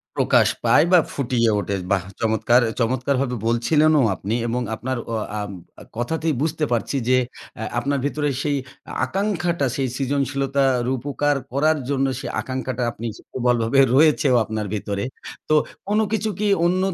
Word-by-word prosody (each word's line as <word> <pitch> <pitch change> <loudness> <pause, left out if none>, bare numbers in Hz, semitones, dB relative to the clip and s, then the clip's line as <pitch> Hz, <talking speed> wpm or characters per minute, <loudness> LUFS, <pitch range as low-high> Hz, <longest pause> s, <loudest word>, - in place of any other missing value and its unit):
প্রকাশ - - +4 0.2
পায় 155 - +5
বা 180 - +8
ফুটিয়ে 120 -4 +1
ওঠে 100 +1 -2 0.2
বাহ! 95 -3 +2 0.2
চমৎকার 110 +2 +3
অ্যা 110 - -2
চমৎকারভাবে 125 +2 0
বলছিলেনও 150 +6 +3
আপনি 105 +6 -3
এবং 125 +2 -1
আপনার 130 +2 -3 0.2
অ - - 0 0.2
আ - - -2 0.6
কথাতেই 160 +6 -1
বুঝতে 155 0 -1
পারছি 120 +4 0
যে 130 - +5 0.4
অ্যা 110 - -4
আপনার 140 +2 -1
ভেতরে 145 0 0
সেই 145 -1 0 0.5
আকাঙ্ক্ষাটা, 175 -3 -1
সেই 135 -1 0
সৃজনশীলতা 140 0 0 0.2
রূপকার 145 +3 0 0.2
করার 155 +3 +2
জন্য 135 -1 +1
সেই - - -5
আকাঙ্খাটা 130 -1 -3
আপনি 115 +1 -6 0.2
প্রবলভাবে 125 +1 +1 0.2
রয়েছেও 145 -3 +4
আপনার 110 -1 -3
ভেতরে। 100 -1 -3 0.5
তো 155 - +4 0.3
কোন 210 +1 +2
কিছু 220 0 0
কি 210 - +1 0.2
অন্যর 185 +1 +1
135 Hz, 145 wpm, -22 LUFS, 120-150 Hz, 0.6 s, বা